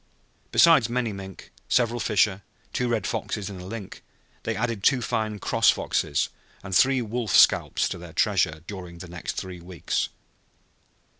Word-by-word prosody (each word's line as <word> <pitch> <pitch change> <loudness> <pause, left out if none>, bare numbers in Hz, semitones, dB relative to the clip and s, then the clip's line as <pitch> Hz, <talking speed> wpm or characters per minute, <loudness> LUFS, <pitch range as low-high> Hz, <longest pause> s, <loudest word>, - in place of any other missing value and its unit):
Besides 160 -9 +6
many 120 -3 -1
mink, 95 -1 -10 0.2
several 120 -1 +2
fisher, 105 -3 +2 0.3
two 125 - 0
red 115 -4 0
foxes 105 -1 -3
and 95 -2 -8
a - - -9
lynx, 105 -1 -7 0.4
they - - -2
added 115 -3 -2
two 130 +5 +4
fine 110 -2 -2
"cross" - - +3
foxes 70 -3 0 0.3
and 95 -1 -3
three 130 +2 +4
wolf 115 -2 -2
scalps - - +5
to - - -5
their - - -10
treasure 80 0 +1
during 90 -3 -8
the 90 +1 -9
next 85 -5 -5
three 90 -2 -6
weeks. 90 -2 -2
105 Hz, 155 wpm, -25 LUFS, 90-120 Hz, 0.4 s, Besides